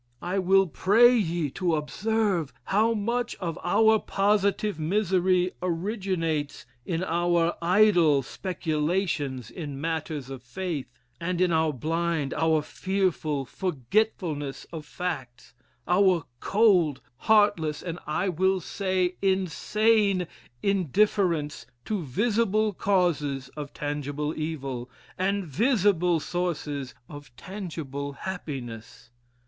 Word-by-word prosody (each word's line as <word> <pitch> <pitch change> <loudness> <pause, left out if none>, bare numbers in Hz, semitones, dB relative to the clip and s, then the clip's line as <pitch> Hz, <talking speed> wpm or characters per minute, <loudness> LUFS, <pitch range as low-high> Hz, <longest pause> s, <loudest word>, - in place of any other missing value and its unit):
I 180 +3 -1
will 195 +1 +4
pray 210 - +5
ye 170 - 0
to 175 0 0
observe 190 +1 0
how 220 +3 +2
much 235 +3 -1
of 170 -4 -4
our 220 0 +4
positive 200 -2 +1
misery 185 +1 +2
originates 175 - -2 0.2
in 170 0 -1
our 170 -1 +1
idle 175 -6 +4
speculations 150 - -2
in 145 -5 -6
matters 155 -3 -3
of 135 -2 -7
faith, 155 +2 -4 0.3
and 175 +1 -2
in 180 -1 +3
our 160 -1 +2
blind, 160 +1 -1
our 160 -2 +2
fearful 165 -6 -1
forgetfulness 155 - -1
of 155 -2 -7
facts 130 -9 -5 0.3
our 180 -1 +3
cold, 185 - +3 0.2
heartless, 175 - +2
and, 175 -1 -5
I 165 +5 0
will 190 +2 +2
say, 185 0 -1
insane 195 +1 +2 0.4
indifference 185 - +1 0.2
to 210 -4 -2
visible 215 - +1
causes 155 -9 0
of 145 0 -7
tangible 145 +1 -3
evil, 135 -6 -4 0.3
and 195 +1 0
visible 180 - +2
sources 150 -6 -3
of 145 -4 -11
tangible 145 - -6
happiness. 130 - -7
175 Hz, 105 wpm, -26 LUFS, 150-195 Hz, 0.4 s, pray